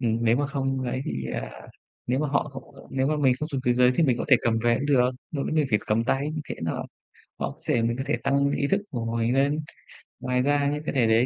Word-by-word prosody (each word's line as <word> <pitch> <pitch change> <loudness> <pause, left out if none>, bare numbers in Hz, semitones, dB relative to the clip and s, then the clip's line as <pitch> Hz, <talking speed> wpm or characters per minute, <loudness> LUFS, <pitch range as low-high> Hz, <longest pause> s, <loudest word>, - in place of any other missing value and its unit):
Ừm, 115 -2 +1
nếu 115 +2 +4
mà 145 - 0
không 135 -2 -2
lấy 130 0 -2
thì, 65 -1 -3
à, - - -4 0.6
nếu 125 +2 +1
mà 150 +1 0
họ 140 +2 0
không 135 -1 -9 0.3
nếu 130 0 0
mà 155 +2 +1
mình 135 -3 +4
không 155 - -2
dùng 135 -4 -2
túi 120 0 +3
giấy 125 0 +5
thì - - +4
mình 125 -4 +2
có - - -2
thể 135 - +8
cầm 115 -1 +2
về 120 +1 +2
cũng 140 - -2
được, 125 -3 +4 0.2
mà 140 -3 -2
vấn - - -2
đề 155 -1 +3
phải 105 - +4
cầm 110 +2 +1
tay 140 +4 0
như 155 - -3
thế - - -3
nó 80 - -2 0.6
họ - - -3
sẽ 115 - +2
mình 115 +2 0
có 135 - -2
thể - - +2
tăng 140 +1 +2
ý 140 0 0
thức 195 +1 +3
của 115 -2 -3
mình 115 +1 +1
lên. 140 +3 +2 0.6
Ngoài 125 0 0
ra 140 +1 +2
những 150 - -4
cái - - -2
thể 120 -4 +4
đấy 110 +2 +4
130 Hz, 275 wpm, -26 LUFS, 120-140 Hz, 0.6 s, thể